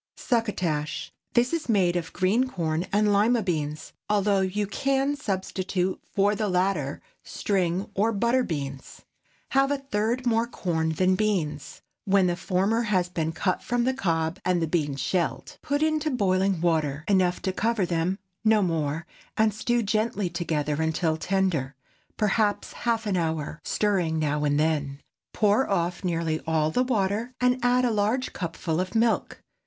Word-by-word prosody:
SUCCOTASH. 180 - -1 0.2
This 245 +5 +3
is 325 -6 -2
made 185 -5 +3
of 170 -2 -2
green 210 +8 +2
corn 165 -4 -2
and 210 0 +3
Lima 220 +3 +3
beans, 155 -5 -3 0.2
although 205 -1 +2
you 195 +2 0
can 275 +6 0
substitute 190 -5 -2
for 200 +1 +2
the 210 0 -1
latter 180 -6 0 0.2
string 185 -1 -1
or 215 +4 +2
butter 235 +4 +2
beans. 140 - -5 0.5
Have 275 0 +3
a 285 - +1
third 250 -1 -1
more 230 -1 +2
corn 160 -8 -1
than 185 +3 +2
beans, 180 -8 -2 0.2
when 195 -1 +4
the 175 -1 +1
former 195 +5 +1
has 190 -6 +1
been 165 -2 -2
cut 185 +2 -1
from 245 0 0
the 260 +2 +1
cob 165 -7 -1
and 180 -1 +2
the 165 - +1
beans 150 -4 -1
shelled. 170 +5 -2
Put 285 +2 0
into 310 0 +1
boiling 195 - +1
water 155 -4 0
enough 185 -3 +2
to 190 - -1
cover 225 -1 +1
them—no 190 +5 0
more—and 165 +6 -1
stew 240 +3 0
gently 215 -3 0
together 155 -3 -1
until 160 0 +1
tender—perhaps 190 - -1
half 230 -1 -1
an 200 -3 0
hour—stirring 165 +2 -1
now 150 -1 0
and 145 0 +2
then. 145 -3 0 0.3
Pour 210 +5 +2
off 175 -2 -1
nearly 165 -3 -1
all 155 -1 +1
the 250 - +1
water, 230 0 0
and 250 0 +2
add 250 +1 +3
a 240 - +2
large 220 +5 0
cupful 165 -2 -3
of 185 +3 -3
milk. 225 0 +1
190 Hz, 150 wpm, -26 LUFS, 165-220 Hz, 0.5 s, when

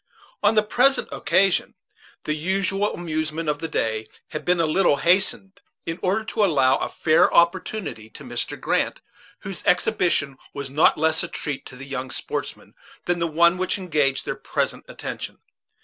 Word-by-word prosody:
On 215 - +3
the 215 - +5
present 255 +6 +2
occasion, 195 -1 +2 0.5
the 155 - -1
usual 195 +5 0
amusement 155 -1 -3
of 150 -1 0
the 165 - -3
day 110 -6 -1 0.2
had 155 - -5
been 180 0 +2
a 165 - +3
little 155 0 +3
hastened, 190 +5 +1 0.2
in 165 +2 -4
order 195 +4 +1
to 220 0 0
allow 135 -8 +4
a - - -3
fair 155 -1 +3
opportunity 170 - +1
to - - -12
Mr. - - -4
Grant, - - 0 0.4
whose 195 -2 -7
exhibition 155 -6 +1 0.2
was 140 -1 -5
not 150 +4 +4
less 160 +1 +2
a - - -3
treat 145 -3 -5
to 125 - -11
the 135 +2 -9
young 135 -2 -5
sportsmen - - -5 0.3
than 175 0 0
the 170 - +1
one 170 +3 +3
which 185 - 0
engaged 150 -8 0
their - - -1
present - - -3
attention. - - -6
165 Hz, 165 wpm, -23 LUFS, 145-190 Hz, 0.5 s, the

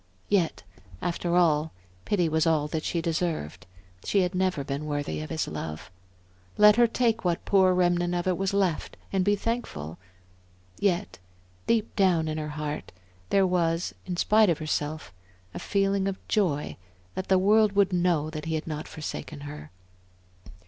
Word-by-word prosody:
Yet, 190 -5 +1 0.4
after 175 - -1
all, 160 -3 +3 0.3
pity 180 -5 +1
was 160 +1 +1
all 155 -2 +2
that 155 0 -3
she 170 -1 -1
deserved; 160 - -2 0.4
she 200 - +2
had 180 0 0
never 185 -5 0
been 140 +2 -4
worthy 145 0 -2
of 155 - -7
his 160 -1 -2
love. 75 +3 -6 0.7
Let 210 0 +7
her 240 -1 +6
take 230 -1 0
what 175 -2 -1
poor 190 -2 +4
remnant 175 -1 +2
of 175 - -1
it 185 -1 +2
was 195 +1 -1
left 195 -5 0 0.2
and 190 -1 +2
be 205 +2 +3
thankful. 90 - -4 0.8
Yet 195 - 0 0.5
deep 225 -2 +1
down 180 -6 +3
in 155 0 -2
her 150 0 -4
heart, 150 0 -4 0.4
there 195 -1 +4
was, 170 -2 0
in 180 -1 -3
spite 215 +2 +4
of 165 - +2
herself, 155 -2 -3 0.4
a - - -5
feeling 195 -1 +1
of 195 -1 -2
joy 165 -9 0 0.4
that 190 - -4
the 190 - +4
world 210 +2 +4
would 200 -2 +3
know 175 -4 +1
that 155 0 -6
he 160 0 -1
had 155 - -3
not 155 -1 -5
forsaken 155 -1 -6
her. 145 +1 -8
175 Hz, 165 wpm, -27 LUFS, 155-195 Hz, 0.8 s, Let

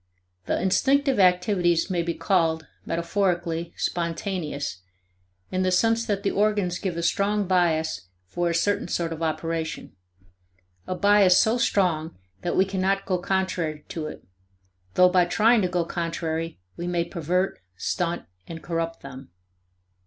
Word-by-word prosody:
The - - 0
instinctive 270 +8 +2
activities 180 -1 +3
may 175 -2 +1
be 170 0 -2
called, 165 -4 +1 0.2
metaphorically, 170 -1 -1
spontaneous, 165 - -3 0.7
in 185 - 0
the 185 - +2
sense 225 +5 +2
that 200 -2 -1
the 195 - +1
organs 205 -4 +1
give 185 -4 -3
a 170 - -2
strong 205 +3 +1
bias 160 - +1 0.2
for 175 - -1
a 170 - -1
certain 205 +4 +1
sort 170 -1 -1
of 160 - -8
operation, 160 -2 -3 0.9
a 185 - -2
bias 200 -2 +5
so 225 +3 +3
strong 170 - +1 0.2
that - - -2
we 190 - +5
cannot 195 +1 0
go 185 -2 0
contrary 175 -5 -2
to 155 -2 -4
it, - - -9 0.7
though 180 - +7
by 180 -1 +4
trying 225 +5 +4
to 185 - +1
go 175 -2 0
contrary 165 -1 -3 0.2
we 175 - -5
may 175 -1 0
pervert, 175 +2 -1 0.2
stunt, 170 - -2 0.2
and 165 -1 -8
corrupt 165 -1 -3
them. 135 -1 -10
175 Hz, 145 wpm, -25 LUFS, 165-195 Hz, 0.9 s, though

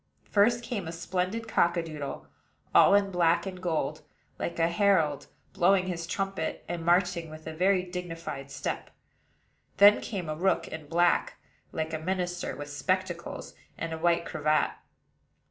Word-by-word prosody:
First 235 +4 +4
came 225 -7 -4
a - - -4
splendid 185 +6 -2
cock 175 -5 +2
a 170 - 0
doodle, 150 -4 -6 0.5
all - - +7
in 200 -1 +2
black 175 -1 +2
and 185 -2 -6
gold, 165 -4 -1 0.4
like - - -3
a 165 0 +3
herald, 170 -5 +2 0.3
blowing 185 +1 +4
his 170 -2 -4
trumpet, 195 -4 -3
and 170 -1 -4
marching 175 -1 +2
with 155 0 -11
a 160 - -5
very 185 +3 +2
dignified 170 -6 -6
step. - - -4 0.9
Then 205 +1 +8
came 190 -6 -4
a 155 - -2
rook, 190 +4 +1
in 160 -2 -8
black, 170 +2 +2 0.4
like 160 0 -3
a 160 - -1
minister, 180 +1 -2
with 145 0 -7
spectacles 175 +2 -2 0.2
and 160 -1 -4
white 170 0 +2
cravat. 155 -1 +1
175 Hz, 150 wpm, -28 LUFS, 160-190 Hz, 0.9 s, Then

